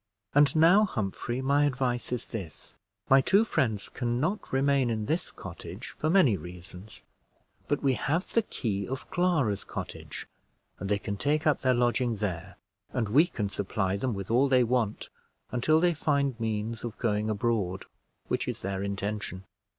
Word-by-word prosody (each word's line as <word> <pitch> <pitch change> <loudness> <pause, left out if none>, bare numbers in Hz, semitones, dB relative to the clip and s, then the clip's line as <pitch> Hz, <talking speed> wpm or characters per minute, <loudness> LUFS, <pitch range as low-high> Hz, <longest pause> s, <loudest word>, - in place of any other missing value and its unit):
"And 145 +1 +5
now, 175 +7 +6
Humphrey, 120 - -3
my 140 +2 +3
advice 125 -4 -1
is 125 -1 -3
this. 95 -9 -7 0.3
My 135 0 +6
two 200 +10 +4
friends 110 - 0
can 120 -1 -2
not 185 +9 -2
remain 135 -1 +2
in 110 -2 -1
this 160 +9 -1
cottage, - - -8
for 155 - -2
many 170 - +5
reasons; 90 +3 -11 0.6
but 145 - 0
we 135 -2 +3
have 155 - 0
the 230 - +4
key 105 - -3
of 135 +1 -5
Clara's 160 - +1
cottage, - - -7 0.5
and 95 - -4
they 105 - +3
can 100 0 -4
take 150 +6 0
up 150 -2 +3
their 130 -1 +3
lodging 120 0 +1
there, 95 -5 -4 0.4
and 115 -5 -1
we 150 +10 +5
can 105 - -3
supply 100 -1 -1
them 115 +3 -1
with 100 +2 -5
all 130 +4 +4
they 130 -1 +5
want, 115 -3 -1 0.4
until 155 +6 +3
they 175 +1 +3
find 140 -5 0
means 110 0 -2
of 115 -2 -5
going 105 -2 0
abroad, 100 -4 -1 0.4
which - - -1
is - - -4
their 95 0 -3
intention. 100 -1 -3
120 Hz, 165 wpm, -28 LUFS, 105-140 Hz, 0.6 s, now